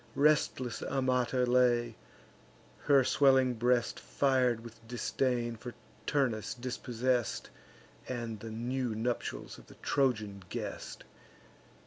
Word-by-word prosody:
Restless 140 -4 +2
Amata 130 -1 +1
lay, 120 -2 +3 0.9
her 140 -2 +6
swelling 130 -1 +4
breast 120 +1 +1
Fir'd 130 -4 +1
with 115 -1 -13
disdain 120 0 -1
for 120 +1 -8 0.3
Turnus 125 -8 0
dispossess'd, 125 -1 -1 0.6
And 120 -3 -4
the 115 - -7
new 120 +1 -2
nuptials 120 +2 -3
of - - -17
the - - -14
Trojan 110 -8 0
guest. - - -5
125 Hz, 100 wpm, -32 LUFS, 115-130 Hz, 0.9 s, her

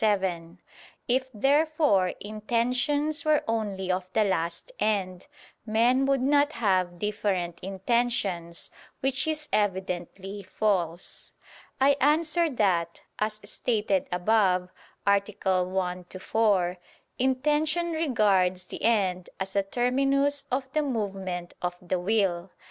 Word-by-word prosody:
7). 185 -4 0 0.5
If, 260 +1 +1
therefore, 280 - +2
intentions 245 +8 0
were 310 -2 +3
only 205 -4 -1
of 185 0 -2
the 220 - +3
last 170 - -2
end, 190 -1 -1 0.4
men 240 +5 +2
would 275 -2 +2
not 290 +2 +3
have 185 -5 +1
different 190 -4 -2
intentions: 195 -3 -1 0.3
which 270 +3 0
is 305 -1 -2
evidently 190 0 -2
false. 185 -3 -2 0.5
I 275 +1 +4
answer 315 +3 +3
that, 180 - 0 0.2
As 215 0 -1
stated 210 -4 0
above 185 -1 +2 0.3
(A. 200 0 +4 0.4
1, 180 0 -2
ad 185 - -7
4), 195 -5 +2 0.4
intention 300 +6 +1
regards 205 - +2
the - - -8
end 190 -6 +1
as 190 0 -4
a 200 - +4
terminus 275 +6 +1
of 260 +1 -1
the 305 - +2
movement 195 -9 -3
of 180 0 -2
the 180 0 -2
will. 190 -2 0
210 Hz, 115 wpm, -27 LUFS, 185-265 Hz, 0.5 s, I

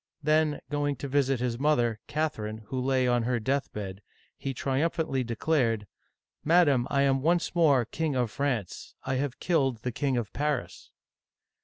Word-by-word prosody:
*' - - -43
Then, 155 0 +2
going 145 -1 0
to 140 - -6
visit 135 -2 +1
his 120 -1 -2
mother, 120 -7 +2
Catherine, 110 -8 -3
who 130 -1 -2
lay 130 -1 +2
on 120 -1 +3
her 120 +1 0
deathbed, 105 -6 -3 0.3
he 135 - -4
tri 135 +1 -1
umphantly 160 -5 0
declared: 115 -2 0 0.6
Madam, 145 -7 +4
I 140 -1 +2
am 135 -1 +2
once 170 +4 +1
more 145 -8 +4
King 160 +1 -2
of 120 -4 0
France. 125 -9 -3
I 130 - -1
have 135 -1 -2
killed 135 -10 +1
the 125 - -1
King 135 +1 0
of 115 -3 -3
Paris 145 -3 -2
135 Hz, 165 wpm, -28 LUFS, 120-150 Hz, 0.6 s, Madam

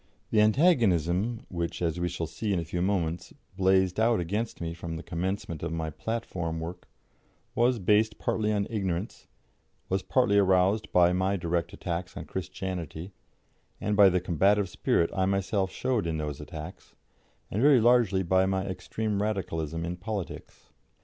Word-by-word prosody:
The 105 - +4
antagonism 110 - +2
which, 85 -2 -3
as 85 -1 -1
we 90 0 0
shall 85 -1 -3
see 105 +6 -4
in 95 - +1
a 85 - -4
few 85 +2 -3
moments, 85 -3 -1 0.2
blazed 95 0 +2
out 115 -1 +3
against 105 +7 -3
me 85 -1 -3
from 85 -1 -6
the 80 - -6
commencement 85 -2 -3
of 85 - -3
my 80 -1 -3
platform 85 -5 -3
work, 85 +2 -7 0.7
was 125 +1 +3
based 105 +2 +2
partly 110 -1 0
on 100 -1 +1
ignorance, 95 -2 -3 0.6
was 95 0 +1
partly 120 -4 +3
aroused 95 +2 +2
by 90 0 +5
my 95 +2 +1
direct 85 -1 -1
attacks 90 +1 -5
on - - -6
Christianity, 90 -1 -5 0.7
and 105 - -1
by 100 -1 +8
the 90 0 +1
combative 95 +3 +2
spirit 85 - +1
I 95 -1 +1
myself 95 0 0
showed 120 -7 -1
in 80 -1 -1
those 75 -2 -4
attacks, 75 +1 -9 0.6
and 105 - -1
very 140 -1 +6
largely 115 -5 +4
by 95 +2 +3
my 95 0 0
extreme 105 +2 -3
Radicalism 85 -6 -2
in 85 +1 -4
politics. 100 0 -6
95 Hz, 160 wpm, -28 LUFS, 85-105 Hz, 0.7 s, by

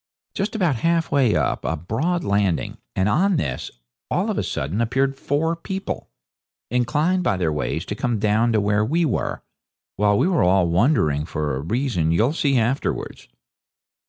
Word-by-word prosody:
Just 205 +3 -2
about 175 - +1
half 165 +5 +1
way 130 -6 +3
up - - 0
was - - -1
a - - -3
broad 155 - -1
landing, 100 -4 0 0.2
and 95 +1 +1
on 185 - +2
this, 70 - -2 0.4
all - - 0
of - - -3
a - - 0
sudden, 85 +12 -2
appeared 135 +4 +1
four 150 +5 0
people, 190 +4 -5 0.6
inclined 150 +9 +1
by 100 - +1
their 85 -4 0
ways 75 +1 -2
to - - -4
come 120 +2 -1
down 110 +3 +2
to 110 - +3
where 105 +1 +2
we 165 +9 +1
were, 130 - -2 0.5
while 105 0 +3
we - - +3
were 180 -4 +2
all 90 0 +3
wondering, 85 - +2
for 75 -3 -2
a - - -3
reason 95 - 0
you'll 110 - +2
see 140 -5 +1
afterwards. 120 +4 -2
115 Hz, 175 wpm, -22 LUFS, 95-155 Hz, 0.6 s, way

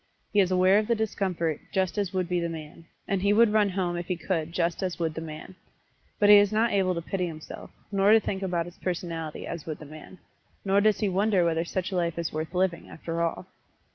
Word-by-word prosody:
He 205 - +4
is 190 -2 +4
aware 185 +2 +4
of 215 - -2
the 235 - +2
discomfort, 185 -7 -1
just 190 -1 0
as 200 -3 -1
would 185 -2 -1
be 180 0 0
the 170 0 -2
man 160 0 -9 0.2
and 195 -2 0
he 200 +1 +3
would 220 0 +5
run 210 -2 +4
home 180 -2 -1
if 175 0 -5
he 180 - -1
could 165 -1 -2
just 170 -1 -1
as 185 -2 -2
would 165 -2 -1
the 160 - -5
man. 155 +3 -8 0.6
But 205 - +4
he 210 - +10
is 205 0 +4
not 225 +2 +2
able 190 -2 +1
to 170 - -4
pity 180 0 -2
himself, 155 -2 -9 0.2
nor 200 0 +4
to 225 - +7
think 195 -2 -4
about 175 -3 -1
his 175 0 -12
personality 165 -3 -4
as 170 -2 -6
would 155 -2 -4
the 155 - -11
man, 155 +5 -12 0.5
nor 195 +1 +3
does 215 +1 +2
he 210 - +2
wonder 195 -1 +2
whether 165 0 +1
such 185 +2 -3
a - - -3
life 170 -2 0
is 170 -1 -3
worth 155 +3 -4
living, 180 -1 0
after 165 +1 -4
all. 165 -1 -2
180 Hz, 240 wpm, -27 LUFS, 165-200 Hz, 0.6 s, he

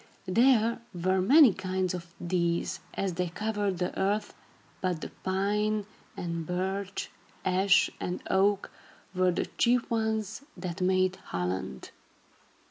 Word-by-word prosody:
There 230 +3 +3
were 185 +2 +1
many 265 - +7
kinds 185 -1 -1
of 175 -1 -5
these, 170 +1 0 0.2
as 195 -2 -1
they 180 0 -1
covered 205 0 -1
the 180 0 -2
earth, 205 +2 0 0.5
but 180 -3 0
the - - -6
pine 205 +2 0 0.3
and 170 -1 -3
birch, 190 +3 -3 0.3
ash 190 +1 +4
and 180 - -3
oak, 195 +1 +2 0.4
were 185 0 +3
the 175 - 0
chief 245 0 +3
ones 220 -1 -1 0.2
that 180 0 -5
made 185 0 +2
Holland. 90 -7 -4
190 Hz, 125 wpm, -29 LUFS, 180-210 Hz, 0.5 s, many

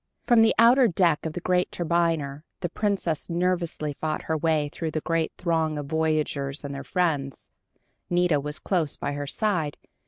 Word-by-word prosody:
Upon 240 -3 +5
the 225 - +4
outer 240 +2 +6
deck 170 -5 +2
of 155 - -6
the 175 - -5
great 180 0 +1
turbiner, 165 -4 0 0.2
the 175 - -1
Princess 190 -5 -1
nervously 170 -3 -1
fought 155 +2 -3
her 160 - -1
way 155 -1 +1
through 165 - -3
the 155 0 -3
great 165 -1 0
throng 160 -3 0
of 145 - -4
voyagers 150 -2 -1
and 140 - -5
their 140 0 -6
friends. 145 -4 -1 0.6
Nita 175 -4 +2
was 150 +1 -4
close 170 -7 -1
by - - -3
her 145 0 -4
side. 170 -5 -1
160 Hz, 175 wpm, -26 LUFS, 150-180 Hz, 0.6 s, outer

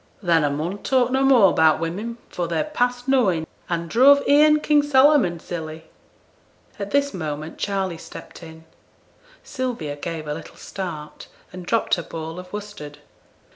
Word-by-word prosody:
'Then 165 -3 +3
a 145 - +2
mun 160 +8 -3
talk 255 0 +1
no 265 +1 +1
more 245 -8 +5
'bout 160 -1 +4
women, 200 +8 -4
for 175 -1 -4
they're 165 -1 -1
past 245 -4 -2
knowin', 200 -12 +2 0.2
an' 170 -1 -2
druv 275 - +5
e'en 300 +1 +5
King 300 -1 +3
Solomon 275 - +4
silly.' 160 -2 -7 1.0
At 200 -1 -4
this 280 +2 +1
moment 155 -2 -5
Charley 190 -4 -2
stepped - - -11
in. 160 -1 -12 0.8
Sylvia 240 - -4
gave 155 +1 -6
a 150 - -2
little 160 - -10
start 170 -6 -7 0.3
and 180 -1 -9
dropped 230 +3 0
her 175 - +2
ball 160 +1 -7
of 180 0 -11
worsted. 205 -8 -8
185 Hz, 155 wpm, -22 LUFS, 160-255 Hz, 1.0 s, more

